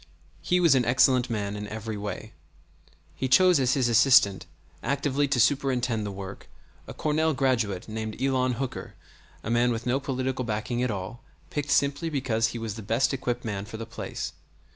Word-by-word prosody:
He 180 - +2
was 170 -5 +5
an 130 -2 +3
excellent 125 +1 +3
man 105 -3 -2
in 105 0 -5
every 110 +1 -5
way. 105 +1 -6 0.8
He 130 - -2
chose 180 +4 +5
as 130 -1 +2
his 130 -3 +2
assistant, 115 -4 +4 0.3
actively 140 +2 0
to 135 -2 0
superintend 125 -4 +1
the - - -4
work, 95 0 -8 0.4
a - - -7
Cornell 155 0 +1
graduate 115 -9 0
named 110 0 -5
Elon 130 -1 +1
Hooker, 130 +2 -5 0.5
a 110 - -3
man 120 +1 +3
with 115 0 -3
no 125 +2 +1
political 130 -1 -2
backing 115 +2 -2
at 125 - 0
all, 100 +4 -5 0.3
picked 145 0 -3
simply 145 +4 +1
because 125 -6 0
he 115 - -5
was 115 -2 -4
the 110 - -8
best 115 +7 +1
equipped 125 -2 -3
man 100 -3 -3
for 110 +2 -8
the 115 - -6
place. 115 - -6
120 Hz, 180 wpm, -26 LUFS, 110-135 Hz, 0.8 s, was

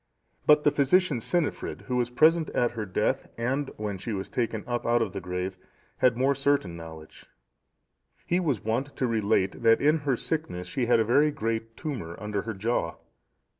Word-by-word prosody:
But 150 0 +6
the 145 - +4
physician, 145 0 +3
Cynifrid, 170 +7 -2
who 125 - -3
was 120 -1 +1
present 160 +6 +4
at 120 - +2
her 110 -3 -5
death, 90 - 0
and 135 +4 -1
when 105 -3 -4
she 110 +4 -4
was 95 -1 -4
taken 115 -3 -2
up 120 -1 -2
out 120 +1 +3
of 110 -5 -1
the 100 - -4
grave, 90 +1 -4 0.4
had 125 -2 +3
more 135 +2 +3
certain 140 -10 0
knowledge. 80 -1 -11 1.0
He 175 - +1
was 145 - -1
wont 125 +6 -2
to 130 - 0
relate 110 -4 +1
that 115 -1 +5
in 150 +3 +3
her 140 -4 0
sickness 150 - -3
she 120 +6 -2
had 120 - +4
a 110 - +2
very 145 +7 +4
great 115 -4 -3
tumour 110 - -5
under 105 0 -2
her 110 -1 -5
jaw. 95 -5 -1
120 Hz, 185 wpm, -27 LUFS, 105-140 Hz, 1.0 s, But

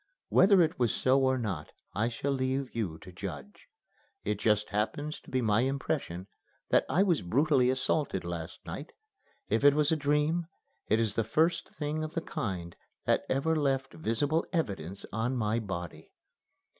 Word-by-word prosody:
Whether 190 -2 +6
it 160 -4 -1
was 120 -3 +3
so 130 +1 +3
or 130 0 +3
not 100 -11 -4 0.2
I 110 +3 +1
shall 130 +4 -2
leave 130 -1 -1
you 95 -9 -2
to 90 - -10
judge. 100 - -8 0.6
It 105 -1 -1
just 105 -1 +2
happens 145 +9 -2
to - - -16
be 130 -1 0
my 110 0 +3
impression 135 - -2 0.4
that - - +4
I 185 - +4
was 175 -6 +2
brutally 130 - +3
assaulted 130 - 0
last 85 0 -6
night. 150 - -7 0.5
If - - +1
it 145 0 +7
was 150 0 +3
a - - +4
dream, 150 +3 +1 0.4
it 110 - +3
is 110 -3 +1
the 115 - +1
first 160 +9 +1
thing 155 +1 -2
of 155 - -6
the 165 - 0
kind 95 - -4 0.3
that - - +2
ever 150 +5 +1
left 135 -3 0
visible 145 +4 0
evidence 100 - -2
on 115 +4 0
my 110 0 +1
body." 90 -6 -6
130 Hz, 170 wpm, -30 LUFS, 105-150 Hz, 0.6 s, it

